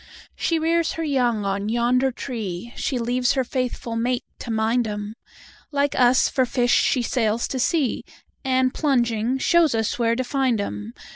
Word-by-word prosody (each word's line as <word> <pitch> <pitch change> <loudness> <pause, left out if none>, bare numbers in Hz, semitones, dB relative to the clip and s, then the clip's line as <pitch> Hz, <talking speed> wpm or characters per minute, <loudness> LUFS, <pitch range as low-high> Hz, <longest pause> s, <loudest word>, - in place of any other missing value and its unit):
She 335 - 0
rears 330 +1 +1
her 330 - -4
young 245 -8 0
on 200 +1 -1
yonder 245 +3 +2
tree, 230 -4 -5
She 260 - -2
leaves 245 +1 +1
her 265 - +1
faithful 245 -2 -3
mate 245 +2 0 0.2
to - - -8
mind 225 +2 +1
'em; 210 0 -5 0.6
Like 285 0 +1
us, 250 0 +4
for 260 - +1
fish, 245 0 +1
she 250 - +3
sails 230 -2 0
to 260 - -3
sea, 280 0 0 0.4
And, 260 -1 +1
plunging, 240 -4 +1
shows 325 -1 +3
us 225 +2 -1
where 230 -1 +2
to 255 - -1
find 255 -3 0
'em. 105 - -5
245 Hz, 165 wpm, -23 LUFS, 225-265 Hz, 0.6 s, us